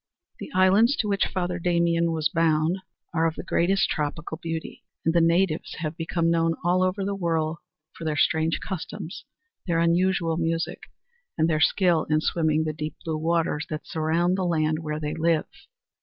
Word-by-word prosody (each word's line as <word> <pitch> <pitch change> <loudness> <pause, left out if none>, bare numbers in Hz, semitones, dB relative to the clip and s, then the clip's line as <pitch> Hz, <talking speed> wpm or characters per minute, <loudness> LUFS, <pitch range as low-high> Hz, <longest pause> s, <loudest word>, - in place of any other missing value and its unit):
The - - -7
islands 200 +8 +5
to 215 - -1
which 200 -2 +1
Father 180 -1 -2
Damien 170 -1 +2
was 160 -2 +1
bound 160 +3 +1 0.3
are 165 0 +2
of 160 - -3
the - - -6
greatest 195 +3 +2
tropical 160 +1 -3
beauty, 165 -1 -5 0.2
and 165 - +3
the 170 - +4
natives 165 0 +1
have 155 -1 -4
become 165 0 0
known 165 0 +2
all 180 +2 +2
over 185 +1 0
the 200 - -1
world 165 -4 -1 0.4
for - - -10
their 155 -2 -1
strange 160 +1 +2
customs, 190 0 -6 0.4
their 170 -2 +1
unusual 170 0 +2
music 165 0 -1 0.6
and 160 - +3
their 155 -2 +1
skill 175 -4 +3
in 155 0 +3
swimming 160 -1 +1
the 155 -1 -2
deep 155 0 -5
blue 160 -1 -1
waters 165 -2 0
that 155 0 -5
surround 170 +4 0
the - - 0
land 155 -3 +1
where 155 -1 -4
they 150 -1 -3
live. 165 0 +1
165 Hz, 175 wpm, -25 LUFS, 160-175 Hz, 0.6 s, islands